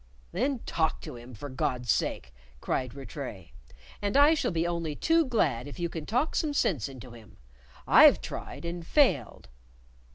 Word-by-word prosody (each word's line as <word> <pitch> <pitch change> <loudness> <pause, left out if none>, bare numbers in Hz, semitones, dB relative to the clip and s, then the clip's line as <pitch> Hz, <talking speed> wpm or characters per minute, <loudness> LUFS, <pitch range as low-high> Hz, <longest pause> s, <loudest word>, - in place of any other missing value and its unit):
"Then 255 +5 -1
talk 160 -1 0
to - - -8
him, 120 +1 -11
for 145 - -7
God's 125 -2 -1
sake," 65 - -2 0.3
cried 130 - -2
Rattray, 135 - -8 0.5
"and 205 +5 0
I 290 +3 +7
shall 320 - 0
be 165 -2 -1
only 170 -3 -2
too 330 - +3
glad 145 - 0
if 145 - -9
you 170 -1 -2
can 160 -2 -7
talk 250 +8 0
some 295 -2 0
sense 145 - +1
into 130 -2 -11
him. 115 -3 -15 0.5
I've - - +8
tried, - - -7
and 170 0 -4
failed." 165 - +1
160 Hz, 165 wpm, -28 LUFS, -, 0.5 s, I've